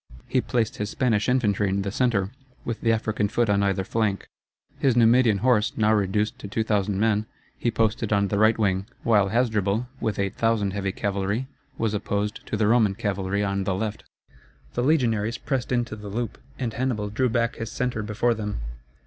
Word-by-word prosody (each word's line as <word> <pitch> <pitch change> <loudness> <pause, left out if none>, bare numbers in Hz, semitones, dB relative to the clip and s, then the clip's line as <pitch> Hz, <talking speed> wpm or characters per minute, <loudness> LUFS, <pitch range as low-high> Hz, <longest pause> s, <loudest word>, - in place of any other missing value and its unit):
He 130 - +1
placed 115 -3 -1
his 105 0 -2
Spanish 120 -5 +1
infantry 105 -6 +2
in 100 +1 0
the 100 - -3
centre, 105 -4 +1 0.3
with 115 -1 -3
the 115 - +3
African 110 -2 0
foot 115 -1 +1
on 100 0 +3
either 95 -1 +1
flank. 105 -1 -1 0.5
His 130 -4 +3
Numidian 115 -3 +4
horse, 110 -4 +3
now 110 0 +3
reduced 105 +1 0
to - - -7
2,000 105 -2 0
men, 110 0 +1 0.3
he 120 - -1
posted 115 -1 0
on 100 -1 +2
the 100 - 0
right 110 +1 +4
wing; 95 -2 0 0.2
while 105 -4 +4
Hasdrubal, 110 -1 +1
with 110 - -1
8,000 100 0 0
heavy 100 -1 -1
cavalry, 100 +5 -1 0.3
was 110 -2 0
opposed 105 0 -2
to - - -2
the 110 - +2
Roman 110 -3 +3
cavalry 100 0 -1
on 100 -1 -1
the 95 -1 -1
left. 105 +2 -3 0.7
The 120 - -1
legionaries 120 -6 +1
pressed 130 -3 -2
into 120 -3 0
the 105 -1 -8
loop, 115 +3 -4 0.2
and 120 -4 -3
Hannibal 115 -5 -1
drew 125 +4 +1
back 115 +1 0
his 115 -2 -5
centre 125 -2 -2
before 105 +3 +1
them. 105 -2 -4
105 Hz, 185 wpm, -25 LUFS, 100-115 Hz, 0.7 s, Numidian